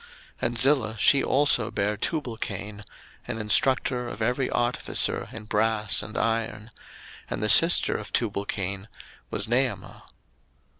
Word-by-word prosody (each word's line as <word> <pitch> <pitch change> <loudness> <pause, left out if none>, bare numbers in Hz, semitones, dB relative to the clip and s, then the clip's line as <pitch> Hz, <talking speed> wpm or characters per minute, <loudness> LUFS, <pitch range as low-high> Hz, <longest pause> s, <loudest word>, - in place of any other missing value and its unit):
01:004:022 - - -20 0.4
And 120 0 -6
Zillah, 120 -4 +1
she 135 +6 +4
also 135 -5 +3
bare 105 +1 -2
Tubalcain, 105 - -5 0.5
an - - -4
instructor 125 +2 +1
of 110 - -9
every 125 +4 -1
artificer 120 0 -2
in 115 - -8
brass 110 0 +1
and 110 - -8
iron: 115 -1 -2 0.6
and - - -4
the - - +1
sister 165 +8 +6
of 105 - -9
Tubalcain 100 -2 -3 0.4
was - - -1
Naamah. 125 +3 -2
115 Hz, 130 wpm, -25 LUFS, 105-125 Hz, 0.6 s, sister